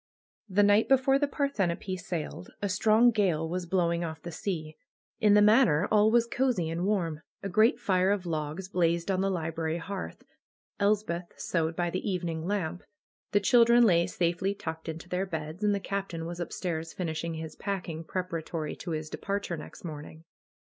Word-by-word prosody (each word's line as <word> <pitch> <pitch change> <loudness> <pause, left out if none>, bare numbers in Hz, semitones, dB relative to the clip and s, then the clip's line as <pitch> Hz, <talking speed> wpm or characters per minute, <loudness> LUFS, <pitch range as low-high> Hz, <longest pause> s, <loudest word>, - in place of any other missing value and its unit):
The 200 +2 +4
night 205 +2 +4
before 270 0 +4
the 290 - +2
Parthenope 200 - -1
sailed 170 -2 -5
a 205 - -1
strong 220 +5 +4
gale 180 -8 +1
was 175 +1 -3
blowing 170 -1 +1
off 160 -2 -5
the 175 - -6
sea. 160 -3 -4 0.4
In 210 -1 +5
the 210 - +6
Manor 210 - +5
all 215 0 +5
was 235 +1 +4
cosey 235 -9 0
and 170 +3 -1
warm. 170 -7 0 0.2
A 195 - -2
great 215 +5 +4
fire 185 -1 +2
of 200 -2 0
logs 160 +2 -3
blazed 170 0 +1
on 190 0 +1
the 195 - +1
library 165 -2 -2
hearth. 190 +2 -6 0.6
Elspeth 200 -4 0
sewed 165 -1 -1
by 175 0 -1
the 185 - -2
evening 170 -3 -2
lamp. 180 -4 -2 0.5
The 205 - +3
chil 235 +4 +6
dren 235 +1 +5
lay 170 -6 +4
safely 180 +3 0
tucked 160 -3 -6
into 160 +2 -7
their 180 +2 -1
beds, 160 +2 -5
and 205 -1 +3
the - - -1
Captain 195 -4 -4
was 170 +1 -6
upstairs 165 -2 -4
finishing 165 -2 -3
his 160 -1 -6
packing 180 -5 -4
preparatory 165 -3 -4
to 180 - -7
his 155 -1 -3
de - - -7
parture 200 -4 -3
next 150 - -11
morning. 155 -1 -8
180 Hz, 180 wpm, -29 LUFS, 165-205 Hz, 0.6 s, the